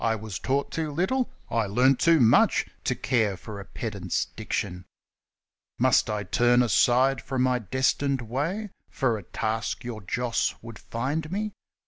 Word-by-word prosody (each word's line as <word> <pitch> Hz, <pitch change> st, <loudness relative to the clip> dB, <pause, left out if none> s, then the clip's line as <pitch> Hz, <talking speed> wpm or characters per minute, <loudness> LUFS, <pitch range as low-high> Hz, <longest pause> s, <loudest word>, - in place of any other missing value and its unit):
1 115 Hz, -, +2 dB
1 110 Hz, -, -5 dB
was 110 Hz, -4 st, -5 dB
taught 140 Hz, +2 st, -1 dB
too 160 Hz, -2 st, -2 dB
little? 190 Hz, -, 0 dB
' -, -, -32 dB
I 115 Hz, -3 st, +1 dB
learnt 125 Hz, +6 st, +3 dB
too 165 Hz, -1 st, +5 dB
much 115 Hz, -3 st, +4 dB, 0.2 s
To -, -, +1 dB
care 110 Hz, -6 st, 0 dB
for 105 Hz, +1 st, -8 dB
a 100 Hz, -, -8 dB
pedant's 100 Hz, -7 st, -3 dB
diction! 90 Hz, 0 st, -4 dB, 0.9 s
Must -, -, +3 dB
I 105 Hz, -1 st, -2 dB
turn 120 Hz, +5 st, +3 dB
aside 125 Hz, +2 st, +3 dB
from 130 Hz, +1 st, -1 dB
my 125 Hz, -1 st, +2 dB
destined 130 Hz, +4 st, 0 dB
way 165 Hz, -, -3 dB, 0.2 s
For 120 Hz, -5 st, 0 dB
a -, -, -9 dB
task 110 Hz, +5 st, -2 dB
your 120 Hz, -3 st, -6 dB
Joss 120 Hz, +5 st, -1 dB
would 115 Hz, -2 st, -9 dB
find 145 Hz, +7 st, -3 dB
me 210 Hz, +2 st, -2 dB
120 Hz, 165 wpm, -26 LUFS, 110-140 Hz, 0.9 s, too